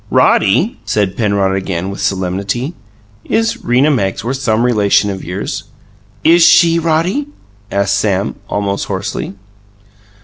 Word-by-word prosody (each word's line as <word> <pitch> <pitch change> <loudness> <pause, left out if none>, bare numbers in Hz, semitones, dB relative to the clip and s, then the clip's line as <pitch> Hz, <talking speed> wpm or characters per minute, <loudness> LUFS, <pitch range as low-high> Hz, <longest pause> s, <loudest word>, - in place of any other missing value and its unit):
"Roddy," - - +2
said 100 -3 -1
Penrod 100 -3 +1
again, 95 -1 -3
with 100 - -7
solemnity, 100 - -2 0.5
"is 225 +1 -1
Rena 130 +5 +3
Magsworth 120 +1 -1
some 115 -4 0
relation 105 -4 +2
of 95 - -6
yours?" 90 +3 -4 0.6
"IS 165 +2 +5
she, 170 0 +5
Roddy?" 170 - 0 0.4
asked 100 -1 +1
Sam, 100 -1 0 0.2
almost 100 -1 -2
hoarsely. 100 0 -4
105 Hz, 115 wpm, -15 LUFS, 95-150 Hz, 0.6 s, IS